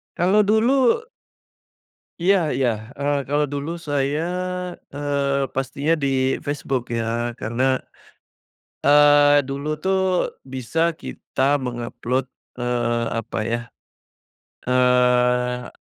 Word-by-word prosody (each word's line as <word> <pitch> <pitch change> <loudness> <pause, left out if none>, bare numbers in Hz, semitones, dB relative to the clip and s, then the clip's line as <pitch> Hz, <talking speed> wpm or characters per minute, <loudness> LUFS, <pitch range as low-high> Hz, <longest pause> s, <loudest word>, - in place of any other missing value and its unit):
Kalo 195 +4 +3
dulu 245 - +3 1.2
Iya 195 +3 +4 0.2
iya, 130 -2 +2 0.3
eee, 145 0 +1
kalau 145 +1 +1
dulu 145 +3 -3 0.2
saya, 145 +1 0 0.7
eee, 140 -1 -1
pastinya 135 +4 -1
di - - +2 0.4
Facebook 140 -3 -2 0.2
ya, 120 +1 -2
karena, 130 +3 0 1.1
eee, 145 0 +6
dulu 140 +2 -4
tuh, 190 0 +1 0.6
bisa 160 +7 0
kita 140 +2 -1
meng-upload, 125 +1 -3 0.4
eee, 120 -1 0
apa 115 - -5
ya, 120 - 0 1.1
eee 125 -1 +2
140 Hz, 90 wpm, -22 LUFS, 125-145 Hz, 1.2 s, eee